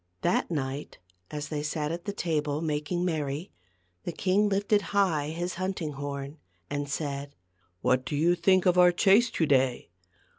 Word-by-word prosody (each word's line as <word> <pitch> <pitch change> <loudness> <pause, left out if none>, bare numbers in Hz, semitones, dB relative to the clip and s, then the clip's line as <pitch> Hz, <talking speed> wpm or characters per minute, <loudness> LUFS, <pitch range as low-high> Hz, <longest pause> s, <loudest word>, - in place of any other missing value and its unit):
That 175 - +1
night 140 -3 -4 0.3
as 150 0 -5
they 150 -2 -2
sat 150 0 -2
at 170 +2 -5
the 205 - -2
table 150 -6 -1
making 155 +3 -1
merry, 155 -1 -2 0.5
the - - -3
king 195 +5 +2
lifted 205 +1 +2 0.2
high 165 -7 +2
his 175 +3 -3
hunting 185 -5 -2
horn, 140 +1 -6 0.3
and 145 -1 -2
said, 140 -1 -4 0.2
" 90 0 -42
What 130 0 +2
do 130 +3 -4
you 165 +4 +3
think 185 +1 +3
of 180 -1 +4
our 180 0 +7
chase 200 +7 +4
to 165 - 0
day 130 -3 +2
155 Hz, 170 wpm, -28 LUFS, 145-180 Hz, 0.5 s, our